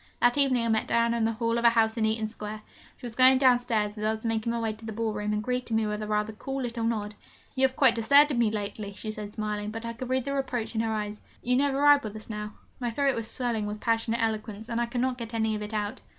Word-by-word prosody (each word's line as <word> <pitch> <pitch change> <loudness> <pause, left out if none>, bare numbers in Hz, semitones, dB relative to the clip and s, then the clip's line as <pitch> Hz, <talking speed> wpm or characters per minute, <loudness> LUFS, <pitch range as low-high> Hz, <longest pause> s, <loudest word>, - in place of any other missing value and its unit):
That 245 0 +4
evening 265 -4 +2
I - - 0
met 220 -1 +1
Diana 235 0 +2
in 225 - +1
the 225 - +1
hall 230 +1 0
of - - -4
a 235 - +8
house 225 -1 +2
in 225 -2 +1
Eaton 220 0 0
Square. 215 -1 -7 0.4
She 255 - -10
was 235 - -6
going 255 +2 +6
downstairs 245 -5 +2
as - - -4
I 215 - +2
was 220 +1 -3
making 225 0 0
my 235 - -1
way 225 -1 -1
to 220 +1 -12
the 220 - -5
ball 220 0 -2
room, 210 0 -2
and 210 0 -1
greeted 250 -1 -2
me 220 0 +2
with 210 0 -3
a 215 - -4
rather 210 0 -1
cool 270 +5 -5
little 235 -1 -3
nod. 215 -2 -1 0.4
'You 265 -1 +3
have 260 - -13
quite 265 -4 +5
deserted 280 +3 +4
me 230 -2 +3
lately,' 205 -1 -4
she 215 +2 -5
said, 210 -1 -7
smiling, 210 -1 -3
but 225 +2 -6
I 230 - -4
could 245 +2 -7
read 260 -1 0
the 280 - -2
reproach 245 -5 -2
in 225 - 0
her 225 -1 -1
eyes, 210 -1 -3 0.2
'you 250 +1 +2
never 275 +1 +2
ride 290 0 +6
with 215 -1 -6
us 215 +1 -7
now.' 210 0 -5 0.3
My 245 -2 -1
throat 275 +3 +1
was 230 -2 -3
swelling 235 -4 -1
with 210 0 -5
passionate 230 0 0
eloquence 220 0 -3
and 235 0 -1
I 240 - 0
could 240 +1 -2
not 255 -1 -1
get 230 0 -6
any 220 -1 +1
of 210 - -4
it 210 +1 -5
out. 210 -1 -3
225 Hz, 285 wpm, -27 LUFS, 215-245 Hz, 0.4 s, a